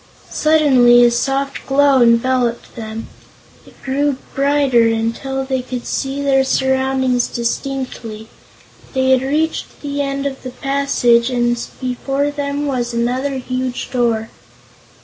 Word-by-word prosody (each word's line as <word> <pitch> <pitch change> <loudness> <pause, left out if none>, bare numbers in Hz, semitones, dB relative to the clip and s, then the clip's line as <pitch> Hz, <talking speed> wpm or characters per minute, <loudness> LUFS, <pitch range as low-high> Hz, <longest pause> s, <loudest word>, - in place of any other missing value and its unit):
Suddenly 260 -6 +5
a 240 - +4
soft 275 +3 -1
glow 275 -1 +4
enveloped 240 0 +1
them. 220 -1 -6 0.6
It - - -19
grew 280 +1 0 0.2
brighter, 275 -4 +3
until 230 +4 -2
they 265 -1 -1
could 250 -1 -6
see 275 +1 -3
their 270 -1 +3
surroundings 265 -1 +1
distinctly. 235 -3 -4 0.7
They 260 0 +2
had 260 -1 +4
reached 305 +4 -2
the 285 0 -2
end 275 0 -2
of 270 -1 -4
the 255 - -6
passage 260 -3 +1
and 240 -1 +1 0.2
before 270 +3 -2
them 285 0 -3
was 245 -4 -2
another 255 +4 -1
huge 255 0 -4
door. 230 -3 0
260 Hz, 125 wpm, -18 LUFS, 240-275 Hz, 0.7 s, Suddenly